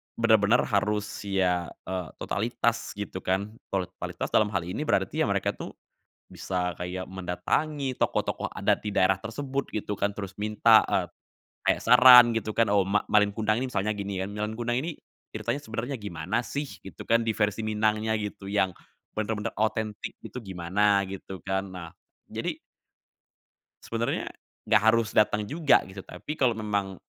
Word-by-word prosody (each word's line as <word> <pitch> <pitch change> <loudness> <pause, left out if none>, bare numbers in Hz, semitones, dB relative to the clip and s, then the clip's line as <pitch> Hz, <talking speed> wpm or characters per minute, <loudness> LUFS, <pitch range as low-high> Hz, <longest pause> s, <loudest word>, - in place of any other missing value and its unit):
benar-benar 110 0 +4
harus, 105 -1 0 0.2
ya, 90 -3 +1 0.2
eee, 90 -3 -4
totalitas 115 +2 -1
gitu 100 -2 -5
kan. 95 +3 -1 0.2
Kalo 95 -1 -1
totalitas - - -5
dalam 110 - +4
hal 90 - +1
ini 90 - -4
berarti - - +1
ya - - +2
mereka - - +1
tuh - - -8 0.5
bisa 90 -2 -3
kayak 90 +1 -5
mendatangi 130 - -2
tokoh-tokoh - - -1
adat - - 0
di 105 - -3
daerah 95 -1 +3
tersebut 135 +4 -4
gitu 105 -1 -3
kan, 100 - 0
terus 100 -1 -7
minta, 105 +1 +5
eee, - - 0 0.6
kayak - - +2
saran 125 -1 +9
gitu 115 -1 -2
kan, 115 +1 +3
oh, 100 - +5
Ma 100 +2 0
Malin 105 -1 +4
Kundang 110 +2 0
ini 130 - -3
misalnya 105 -1 0
gini 100 -1 -4
kan, 95 +2 -4
Malin 105 +1 -3
Kundang 120 +2 0
ini, 165 0 -5 0.3
ceritanya 120 +6 -3
sebenernya 120 +2 -4
gimana 105 +1 -3
sih? 145 +4 -4 0.2
Gitu 95 - -10
kan, 115 0 +3
di 115 - 0
versi 105 0 0
Minangnya 110 0 +1
gitu 105 -2 -6
yang 95 -3 +1 0.4
bener-bener 110 +1 -2
otentik 110 -1 -2
gitu 125 - -8
gimana 100 +2 +1
gitu, 95 0 -7
kan. 95 +2 -2
Nah, 85 -2 -7 0.4
jadi - - -4 1.3
sebenernya 115 +1 -2 0.4
gak 105 - +5
harus 115 -2 +2
dateng 105 0 +3
juga 155 -1 +4
gitu. 95 0 -8
Tapi 150 - -7
kalo 130 -5 +3
memang 100 -3 -2
105 Hz, 160 wpm, -27 LUFS, 95-115 Hz, 1.3 s, saran